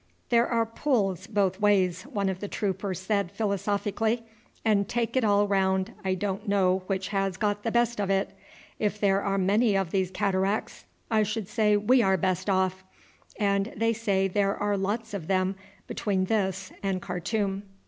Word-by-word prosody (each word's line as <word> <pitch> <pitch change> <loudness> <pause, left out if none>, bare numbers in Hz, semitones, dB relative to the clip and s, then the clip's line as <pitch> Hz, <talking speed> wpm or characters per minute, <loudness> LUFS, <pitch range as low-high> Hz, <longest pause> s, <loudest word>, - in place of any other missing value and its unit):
"There 235 0 +4
are 230 -1 +1
pulls 210 - -1
both 195 -3 0
ways," 195 -4 +2
one 200 -2 0
of 190 -1 -2
the 205 - -4
troopers 195 -2 -2
said 200 -1 -1
philosophically, 205 +2 -1 0.4
"and 200 -3 +2
take 235 0 -1
it 260 - +3
all 205 -1 +3
round 190 -1 +1
I 190 -1 0
don't 200 +2 -3
know 190 -2 +2
which 190 -1 -2
has 195 -2 -1
got 205 0 0
the 230 - -2
best 235 -2 +1
of 195 - -1
it. 195 0 +1 0.5
If 210 0 -1
there 195 -1 +3
are 195 -1 0
many 200 +3 +3
of 190 -4 -1
these 190 -2 +1
cataracts 195 +1 -1 0.3
I 220 -1 +4
should 215 -1 -2
say 210 -1 +2
we 245 +5 +4
are 190 -3 +3
best 185 +2 -1
off, 190 -1 +1 0.6
and 200 0 +1
they 230 0 +2
say 200 -4 +1
there 200 +1 0
are 205 0 0
lots 210 +3 -2
of 180 -6 -5
them 190 0 +1 0.3
between 190 -3 -1
this 190 -3 -1
and 195 -2 -1
Khartoum." 195 +3 -2
200 Hz, 175 wpm, -27 LUFS, 190-210 Hz, 0.6 s, There